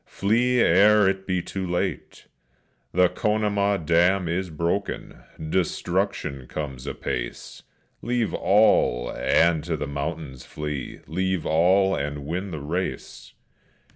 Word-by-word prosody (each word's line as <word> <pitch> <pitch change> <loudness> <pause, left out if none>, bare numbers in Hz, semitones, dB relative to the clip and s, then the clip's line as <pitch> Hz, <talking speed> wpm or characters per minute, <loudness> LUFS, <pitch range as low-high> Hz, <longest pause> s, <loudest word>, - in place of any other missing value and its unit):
flee, 120 +5 +1
ere 105 +1 +5
it 95 0 -1
be 90 -2 0
too 95 - -5
late! 90 -3 -3 0.7
The 90 +1 +4
Conemaugh 100 +1 0
dam 85 +3 +2
is 90 +2 -2
broken, 85 +6 -3 0.3
destruction 70 -6 -1
comes 70 -5 -6
apace! - - -5 0.4
Leave 120 -3 -1
all 95 - +3
and 80 -2 +2
to 85 -2 -2
the 75 - -3
mountains 70 -2 -5
flee; 75 -3 -6
leave 95 +1 -2
all 95 +4 +3
and 75 0 -4
win 90 +6 -3
the 80 -5 -6
race!" 85 +6 -5
90 Hz, 115 wpm, -24 LUFS, 75-95 Hz, 0.7 s, ere